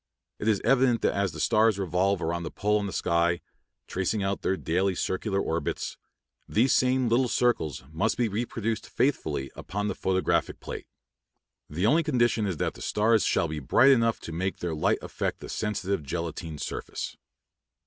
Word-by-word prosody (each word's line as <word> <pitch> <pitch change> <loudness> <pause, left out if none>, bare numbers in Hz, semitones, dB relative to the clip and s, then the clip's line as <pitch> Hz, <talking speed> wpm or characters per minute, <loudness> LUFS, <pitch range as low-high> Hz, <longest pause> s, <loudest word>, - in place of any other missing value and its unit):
It 105 - -3
is 105 -3 +3
evident 130 -3 +3
that - - +3
as 100 -2 0
the - - -9
stars 110 -2 +3
revolve 95 +1 +1
about 85 +1 -1
the 85 - -4
pole 105 +1 +1
on 100 - -2
the - - -4
sky, 85 0 +1 0.5
tracing 95 +3 -1
out 95 0 -1
their 95 - 0
daily 95 +3 0
circular 95 +3 -1
orbits, 80 -5 -2 0.5
these 120 +5 +3
same 130 0 +3
little 120 +3 +3
circles 115 - 0
must 95 +8 0
be 120 - +2
reproduced 115 +1 -3
faithfully 75 - 0
upon 105 +2 -3
the - - -1
photographic 95 0 0
plate. - - -7 0.8
The 85 +6 -1
only 155 +10 +5
condition 120 -8 +1
is 90 -5 -2
that - - -1
the - - -13
stars 110 +1 +2
shall 85 - +2
be 75 -1 -4
bright 125 - +5
enough 115 -3 +3
to - - -7
make 95 +4 -2
their 85 -2 -3
light 75 - +2
affect - - -3
the - - -9
sensitive 100 -4 -2
gelatine 80 +1 -4
surface. - - -5
100 Hz, 175 wpm, -27 LUFS, 85-115 Hz, 0.8 s, only